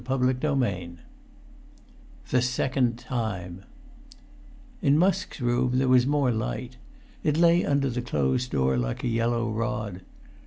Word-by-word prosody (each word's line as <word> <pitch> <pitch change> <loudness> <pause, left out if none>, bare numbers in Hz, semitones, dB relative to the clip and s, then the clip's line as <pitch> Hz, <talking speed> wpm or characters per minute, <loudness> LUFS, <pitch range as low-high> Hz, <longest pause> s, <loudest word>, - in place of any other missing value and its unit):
[Pg - - -19
390] 130 +1 +1 1.6
XXXII - - -4
THE 125 - +5
SECOND 125 -1 0
TIME 100 -7 -4 1.2
In 140 +1 +4
Musk's 190 +1 +1
room 125 0 +1
there 130 0 +2
was 125 0 +4
more 140 -3 +2
light. 120 +3 -4 0.5
It 150 -1 +1
lay 170 +1 +5
under 140 -1 +1
the 125 +1 -2
closed 75 - 0
door 65 - +1
like - - -3
a - - 0
yellow 115 0 0
rod. 105 -4 -3
125 Hz, 130 wpm, -26 LUFS, 110-135 Hz, 1.6 s, THE